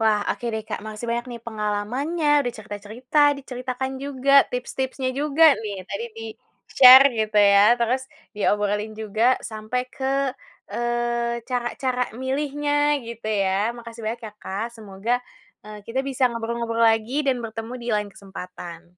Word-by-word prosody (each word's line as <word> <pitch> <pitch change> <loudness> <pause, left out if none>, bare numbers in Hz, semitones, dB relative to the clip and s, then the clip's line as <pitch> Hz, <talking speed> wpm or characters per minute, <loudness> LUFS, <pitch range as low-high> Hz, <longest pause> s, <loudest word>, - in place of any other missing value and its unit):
Wah, 215 -2 +3
oke - - -13
deh 220 - -3
Kak, - - -4
masih 215 +2 -7
banyak 240 +2 -2
nih 235 -1 -7
pengalamannya 235 +9 -2
udah 245 - -3
cerita-cerita 215 +6 -5 0.2
diceritakan 255 0 -4
juga 275 -1 0 0.2
tips-tipsnya 260 +1 -3
juga 300 +2 +3 0.2
nih, 205 -2 -4
tadi 200 +4 -4
di-share 225 +4 +6
gitu 215 -1 +1
ya, 200 -1 +6 0.2
terus 245 +3 +1 0.3
diobrolin 210 +1 0
juga 220 +4 +2
sampai 220 +3 -3
ke 265 -2 -2 0.6
e - - -4 0.7
cara-cara 250 +1 -1 0.2
milihnya 290 +2 0
gitu 230 -2 -7
ya. 200 +1 +1
Makasih 230 -1 -10
banyak 230 +2 -3
ya 210 - -9
Kak 200 +4 -3
semoga 210 +2 -4 0.5
e - - -12 0.2
kita 245 +3 -1
bisa 265 0 -4
ngobrol-ngobrol 230 0 -2
lagi 225 +3 +1
dan 260 -2 +2
bertemu 225 +1 -6
di 235 - -6
lain 210 -1 -1
kesempatan. 180 -3 -9
230 Hz, 140 wpm, -23 LUFS, 210-260 Hz, 0.7 s, di-share